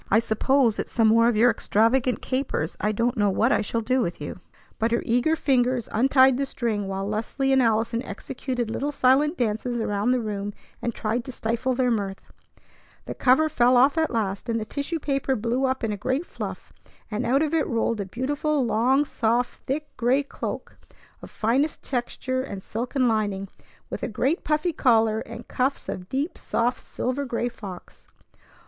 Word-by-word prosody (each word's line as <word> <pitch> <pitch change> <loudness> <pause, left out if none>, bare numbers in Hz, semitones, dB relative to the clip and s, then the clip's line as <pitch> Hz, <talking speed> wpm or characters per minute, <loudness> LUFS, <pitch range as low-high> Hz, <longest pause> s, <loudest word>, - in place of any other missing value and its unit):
"I 210 - +5
suppose 230 +1 +2
it's - - -4
some 225 -2 +3
more 230 +1 +5
of 240 - +2
your 240 +2 +6
extravagant 235 +4 +1
capers. 255 - -2
I 210 +2 +2
don't 235 +4 0
know 205 -1 +3
what 225 +6 +2
I - - +3
shall 230 +2 -2
do 255 +3 +1
with 170 -4 -2
you!" 150 +4 -6 0.4
But 225 - +2
her 235 - +1
eager 250 +7 +2
fingers 255 -5 +1
untied 260 +2 +5
the 275 0 -1
string, 220 -6 -2
while 195 0 -3
Leslie 230 +6 -1
and 265 - +5
Allison 230 0 +1
executed 245 +2 -4
little 285 +5 -2
silent 285 +4 +3
dances 240 +1 -1
around 205 0 0
the 255 0 +3
room 205 -2 -4 0.3
and 240 - -1
tried 230 +2 -1
to - - -6
stifle 235 +2 -1
their 250 -1 +2
mirth. 200 -3 -2 0.9
The - - -5
cover 270 +5 +4
fell 250 -4 +4
off 270 +3 +5
at 320 -1 +1
last, 210 -1 -2
and 230 0 +1
the 215 - -4
tissue 285 +7 -3
paper 275 -3 -1
blew 240 +4 0
up 260 -1 -1
in 225 - 0
a 205 - -3
great 260 - -1
fluff; - - -7 0.4
and 210 +4 -1
out 265 +5 +2
of 310 0 -2
it 320 -2 +2
rolled 230 -2 0
a - - -3
beautiful 285 +6 -1
long, 250 +6 +3
soft, 240 -1 0
thick 295 +3 -3
gray 255 +4 +2
cloak 275 - -6 0.4
of - - -10
finest 260 +8 0
texture 255 0 -2
and 200 -7 -7
silken 250 +3 -1
lining, 205 -4 -1 0.4
with - - -4
a - - -1
great 265 - 0
puffy 310 +3 0
collar 225 -5 +3
and 230 - -9
cuffs 260 +2 -1
of 180 -1 -6
deep, 280 +6 -2
soft 245 +2 0
silver 255 +3 -3
gray 240 -2 -2
fox. 195 -6 -11
240 Hz, 185 wpm, -25 LUFS, 220-265 Hz, 0.9 s, your